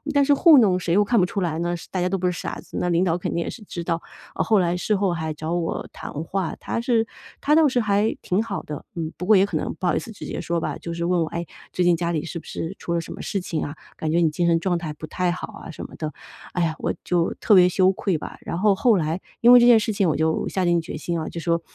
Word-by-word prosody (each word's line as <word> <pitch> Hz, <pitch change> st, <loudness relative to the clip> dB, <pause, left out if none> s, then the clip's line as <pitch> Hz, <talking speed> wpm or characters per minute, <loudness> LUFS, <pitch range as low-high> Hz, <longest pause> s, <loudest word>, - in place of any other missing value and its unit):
但 280 Hz, -, +5 dB
是 285 Hz, -, +5 dB
糊 315 Hz, +1 st, +7 dB
弄 195 Hz, -7 st, +4 dB
谁 175 Hz, -1 st, 0 dB
又 205 Hz, 0 st, +4 dB
看 235 Hz, +1 st, +3 dB
不 180 Hz, -, +3 dB
出 200 Hz, -, -3 dB
来 165 Hz, -2 st, -1 dB
呢？ 175 Hz, 0 st, -1 dB
是 -, -, -12 dB
大 185 Hz, -, -1 dB
家 180 Hz, -, +1 dB
都 195 Hz, -, 0 dB
不 185 Hz, -, -3 dB
是 180 Hz, -, +3 dB
傻 -, -, -4 dB
子， -, -, -12 dB
那 180 Hz, -, 0 dB
领 170 Hz, +1 st, +2 dB
导 175 Hz, -1 st, +1 dB
肯 -, -, -3 dB
定 170 Hz, -, 0 dB
也 -, -, -4 dB
是 230 Hz, -, -10 dB
知 170 Hz, -2 st, -6 dB
道， 165 Hz, 0 st, -1 dB, 0.3 s
呃 -, -, 0 dB
后 220 Hz, -, +3 dB
来 175 Hz, -2 st, +2 dB
事 205 Hz, +4 st, 0 dB
后 195 Hz, -2 st, +1 dB
还 160 Hz, -2 st, -3 dB
找 155 Hz, +2 st, -4 dB
我 170 Hz, -2 st, -2 dB
谈 -, -, -8 dB
话， 190 Hz, -1 st, -2 dB
他 230 Hz, -, -3 dB
是 235 Hz, -2 st, +2 dB, 0.3 s
他 300 Hz, -, +2 dB
倒 315 Hz, -1 st, +6 dB
是 255 Hz, -2 st, +1 dB
还 210 Hz, -1 st, +1 dB
挺 185 Hz, +3 st, +1 dB
好 215 Hz, -4 st, -4 dB
的， 150 Hz, -1 st, -7 dB
嗯， 160 Hz, -1 st, -3 dB
不 180 Hz, -, -6 dB
过 215 Hz, -, +7 dB
也 195 Hz, -, +5 dB
可 -, -, -5 dB
能 -, -, -2 dB
不 -, -, -5 dB
好 175 Hz, -, +2 dB
意 -, -, +1 dB
思 230 Hz, -, -9 dB
直 205 Hz, -, -9 dB
接 -, -, -4 dB
说 170 Hz, 0 st, -1 dB
吧， -, -, -3 dB
就 170 Hz, -, -6 dB
是 170 Hz, 0 st, -3 dB
问 175 Hz, -1 st, +2 dB
我： 160 Hz, -, 0 dB
“哎， 170 Hz, 0 st, -4 dB, 0.3 s
最 180 Hz, -, 0 dB
近 175 Hz, -1 st, +5 dB
家 170 Hz, 0 st, -1 dB
里 155 Hz, -1 st, -2 dB
是 170 Hz, 0 st, -5 dB
不 -, -, -17 dB
是 165 Hz, +4 st, -5 dB
出 170 Hz, -, -2 dB
了 -, -, +1 dB
什 -, -, -8 dB
么 -, -, -8 dB
事 195 Hz, -, -2 dB
情 165 Hz, -3 st, -3 dB
啊， 145 Hz, -, -5 dB, 0.2 s
感 155 Hz, -1 st, -2 dB
觉 170 Hz, -, +2 dB
你 160 Hz, -, +4 dB
精 175 Hz, +2 st, 0 dB
神 165 Hz, -1 st, +3 dB
状 180 Hz, 0 st, 0 dB
态 160 Hz, -3 st, -5 dB
不 155 Hz, -, -8 dB
太 180 Hz, +3 st, -1 dB
好 180 Hz, -, -6 dB
啊？” -, -, -9 dB
什 165 Hz, -, -7 dB
么 -, -, -17 dB
的。 155 Hz, -1 st, -3 dB, 0.4 s
哎 175 Hz, -, +1 dB
呀， 160 Hz, -1 st, 0 dB
我 -, -, -1 dB
就 175 Hz, -1 st, 0 dB
特 215 Hz, -, +2 dB
别 180 Hz, -2 st, +7 dB
羞 185 Hz, +1 st, +4 dB
愧 185 Hz, -3 st, -1 dB
吧， -, -, -8 dB
然 -, -, -4 dB
后 200 Hz, +2 st, +4 dB
后 220 Hz, +2 st, +3 dB
来 165 Hz, +2 st, -1 dB, 0.2 s
因 240 Hz, +1 st, +7 dB
为 245 Hz, -, +10 dB
这 240 Hz, -, +5 dB
件 235 Hz, -2 st, +8 dB
事 215 Hz, 0 st, -1 dB
情 195 Hz, -4 st, +2 dB
我 -, -, +1 dB
就 160 Hz, 0 st, 0 dB
下 185 Hz, -2 st, -1 dB
定 175 Hz, -1 st, +3 dB
决 155 Hz, -, -6 dB
心 170 Hz, +2 st, -2 dB
啊， 155 Hz, -, -4 dB
就 170 Hz, -, -6 dB
说： 170 Hz, 0 st, 0 dB
175 Hz, 335 characters per minute, -23 LUFS, 170-200 Hz, 0.4 s, 为